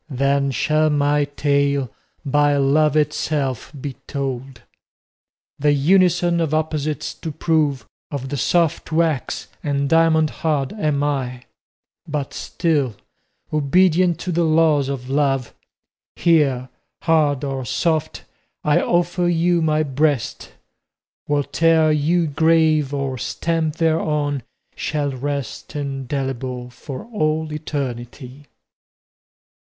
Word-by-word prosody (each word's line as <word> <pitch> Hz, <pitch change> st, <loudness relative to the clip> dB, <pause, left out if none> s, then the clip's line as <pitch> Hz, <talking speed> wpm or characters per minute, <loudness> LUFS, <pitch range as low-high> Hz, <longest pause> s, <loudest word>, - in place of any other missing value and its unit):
Then 140 Hz, +1 st, +1 dB
shall 155 Hz, +4 st, +2 dB
my 145 Hz, 0 st, +2 dB
tale 140 Hz, -3 st, 0 dB, 0.3 s
by 145 Hz, +1 st, +3 dB
Love 150 Hz, +2 st, +3 dB
itself 145 Hz, -4 st, -1 dB
be 140 Hz, 0 st, -5 dB
told. 135 Hz, -3 st, -4 dB, 1.0 s
The 145 Hz, +1 st, +3 dB
unison 175 Hz, +3 st, +3 dB
of 155 Hz, -2 st, 0 dB
opposites 155 Hz, -2 st, -2 dB
to 160 Hz, -, -6 dB
prove, 150 Hz, -4 st, 0 dB, 0.2 s
Of 135 Hz, -2 st, -5 dB
the 145 Hz, -, -3 dB
soft 165 Hz, +4 st, +1 dB
wax 160 Hz, -4 st, 0 dB, 0.2 s
and 140 Hz, -1 st, 0 dB
diamond 160 Hz, -1 st, +3 dB
hard 145 Hz, -4 st, 0 dB
am 150 Hz, -8 st, 0 dB
I; 130 Hz, -4 st, -2 dB, 0.6 s
But 145 Hz, -3 st, -3 dB
still, 145 Hz, -9 st, -1 dB, 0.6 s
obedient 175 Hz, +4 st, +3 dB
to 180 Hz, -, -3 dB
the 170 Hz, 0 st, +1 dB
laws 155 Hz, -3 st, +3 dB
of 130 Hz, -2 st, -4 dB
love, 135 Hz, -2 st, 0 dB, 0.6 s
Here, 140 Hz, -7 st, +2 dB, 0.3 s
hard 150 Hz, -4 st, +2 dB
or 135 Hz, -2 st, -3 dB
soft, 155 Hz, +5 st, -1 dB, 0.4 s
I 150 Hz, -1 st, +3 dB
offer 175 Hz, 0 st, +1 dB
you 175 Hz, 0 st, +2 dB
my 155 Hz, -1 st, +2 dB
breast, 145 Hz, -2 st, -1 dB, 0.8 s
Whate'er 155 Hz, +2 st, +3 dB
you 160 Hz, +3 st, +2 dB
grave 155 Hz, -1 st, +3 dB
or 140 Hz, -3 st, -2 dB
stamp 165 Hz, +1 st, -1 dB
thereon 150 Hz, -4 st, 0 dB, 0.3 s
shall 145 Hz, -2 st, -2 dB
rest 140 Hz, +1 st, -5 dB
Indelible 135 Hz, -3 st, -4 dB
for 130 Hz, +1 st, -8 dB
all 155 Hz, -8 st, -1 dB
eternity. 135 Hz, -2 st, -5 dB
145 Hz, 105 wpm, -21 LUFS, 135-160 Hz, 1.0 s, by